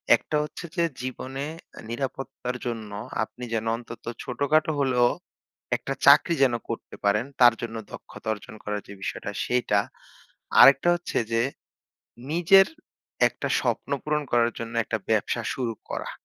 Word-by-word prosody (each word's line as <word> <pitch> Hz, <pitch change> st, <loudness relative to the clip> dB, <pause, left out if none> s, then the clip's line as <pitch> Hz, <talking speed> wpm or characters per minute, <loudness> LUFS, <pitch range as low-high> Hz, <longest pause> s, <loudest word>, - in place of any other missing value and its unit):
একটা -, -, -4 dB
হচ্ছে 150 Hz, +3 st, -7 dB
যে 170 Hz, -, +2 dB, 0.2 s
জীবনে 130 Hz, +2 st, -5 dB, 0.3 s
অ্যা -, -, -11 dB
নিরাপত্তার 125 Hz, 0 st, -4 dB
জন্য 115 Hz, -3 st, -4 dB, 0.3 s
আপনি 125 Hz, +3 st, -9 dB
যেন 115 Hz, -1 st, -1 dB
অন্তত 115 Hz, 0 st, -10 dB, 0.2 s
ছোট-খাটো 145 Hz, +4 st, +1 dB
হলেও 125 Hz, -3 st, +3 dB, 0.7 s
একটা -, -, -4 dB
চাকরি 170 Hz, -, +7 dB
যেন 130 Hz, -3 st, +4 dB, 0.2 s
করতে 115 Hz, -, -6 dB
পারেন 105 Hz, +4 st, +3 dB, 0.2 s
তার 120 Hz, -1 st, +9 dB
জন্য 115 Hz, -1 st, -5 dB, 0.2 s
দক্ষতা -, -, -10 dB
অর্জন 110 Hz, 0 st, -11 dB
করার 105 Hz, 0 st, -3 dB
যে -, -, -9 dB
বিষয়টা 100 Hz, -, -4 dB
সেইটা। 120 Hz, -4 st, +2 dB, 0.8 s
আরেকটা 140 Hz, +5 st, +8 dB
হচ্ছে 175 Hz, -, -4 dB
যে 115 Hz, 0 st, +2 dB, 0.9 s
নিজের 175 Hz, +4 st, +6 dB, 0.6 s
একটা -, -, -5 dB
স্বপ্ন -, -, -1 dB
পূরণ 150 Hz, 0 st, 0 dB
করার 120 Hz, 0 st, +3 dB
জন্য 115 Hz, 0 st, -5 dB
একটা 110 Hz, -, -2 dB
ব্যবসা 110 Hz, +2 st, +1 dB
শুরু 120 Hz, -3 st, -2 dB, 0.2 s
করা। -, -, -4 dB
125 Hz, 140 wpm, -26 LUFS, 115-140 Hz, 0.9 s, তার